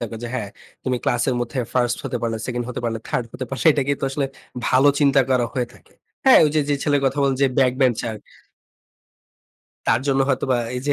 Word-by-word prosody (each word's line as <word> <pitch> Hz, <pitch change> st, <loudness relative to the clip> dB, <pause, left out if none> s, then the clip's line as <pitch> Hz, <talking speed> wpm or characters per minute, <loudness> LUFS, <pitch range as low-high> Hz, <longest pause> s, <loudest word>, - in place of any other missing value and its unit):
থাকে 115 Hz, -1 st, -5 dB
যে, 120 Hz, -, -3 dB
"হ্যাঁ, 105 Hz, -6 st, -3 dB, 0.4 s
তুমি 130 Hz, -1 st, 0 dB
ক্লাসের 125 Hz, +1 st, +1 dB
মধ্যে 120 Hz, +2 st, -3 dB, 0.2 s
1st 120 Hz, -1 st, +2 dB
হতে -, -, -2 dB
পারলে, 115 Hz, -1 st, -1 dB
2nd 120 Hz, -1 st, -3 dB
হতে 125 Hz, -, -4 dB
পারলে, 115 Hz, -1 st, -1 dB
3rd 125 Hz, -, -1 dB
হতে 130 Hz, -, -5 dB
পারলে" 135 Hz, +4 st, -3 dB
এটাকেই 140 Hz, -1 st, 0 dB
তো -, -, -1 dB
আসলে 135 Hz, 0 st, -1 dB, 0.4 s
ভালো 135 Hz, +3 st, +5 dB
চিন্তা 140 Hz, -1 st, +5 dB
করা 125 Hz, -2 st, +2 dB
হয়ে 125 Hz, -2 st, -1 dB
থাকে। -, -, -21 dB, 0.3 s
হ্যাঁ? 265 Hz, -, +8 dB
ওইযে 150 Hz, +1 st, +1 dB
যে 145 Hz, -, +2 dB
ছেলের 145 Hz, -2 st, +2 dB
কথা 135 Hz, +2 st, 0 dB
বললেন 135 Hz, -1 st, +2 dB
যে, -, -, +6 dB
ব্যাক 130 Hz, -2 st, +4 dB
বেঞ্চার 120 Hz, -3 st, +1 dB, 1.7 s
তার 115 Hz, -, +3 dB
জন্য 135 Hz, -1 st, +2 dB
হয়তোবা 130 Hz, -1 st, +1 dB, 0.2 s
এই 125 Hz, -, -3 dB
যে 145 Hz, -, +3 dB
130 Hz, 205 wpm, -22 LUFS, 120-140 Hz, 1.7 s, হ্যাঁ